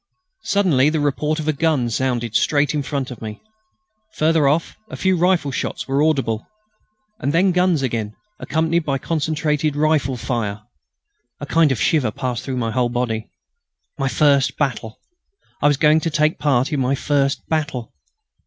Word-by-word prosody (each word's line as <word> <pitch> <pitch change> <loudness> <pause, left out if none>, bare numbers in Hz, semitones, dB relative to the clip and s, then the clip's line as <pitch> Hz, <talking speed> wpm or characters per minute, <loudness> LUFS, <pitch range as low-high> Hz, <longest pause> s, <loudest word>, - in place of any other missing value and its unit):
Suddenly 175 -9 +3
the 155 0 -1
report 150 +1 0
of 155 - -4
a 155 - +2
gun 150 -4 +1
sounded 120 -2 -1
straight 145 +5 +2
in 150 - 0
front 135 -2 -3
of 120 - -9
me. 105 -1 -7 0.8
Further 155 -2 +3
off 155 +4 0
a - - -7
few 190 0 +2
rifle 175 -4 +2
shots - - -4
were 135 +1 +1
audible, 135 -8 0 0.7
and 140 - -1
then 185 +3 +3
guns 180 -5 +2
again, 110 -4 -2 0.2
accompanied 160 +3 0
by 140 -3 -1
concentrated 150 0 -1
rifle 145 -4 +1
fire. 110 -4 -3 0.8
A 145 - -5
kind 155 0 +3
of 130 - -1
shiver 145 -8 +2
passed 125 +1 -4
through 130 -2 -4
my 115 -2 -1
whole 120 +1 +1
body. 120 -2 -2 0.7
My 135 - 0
first 140 -1 +2
battle! 120 -6 -2 0.6
I - - +4
was 145 -2 +3
going 150 +2 +4
to 165 - -2
take 155 +1 +1
part 140 0 +1
in 145 - 0
my 130 +1 +1
first 140 0 0
battle! 145 -7 -2
145 Hz, 165 wpm, -20 LUFS, 125-155 Hz, 0.8 s, I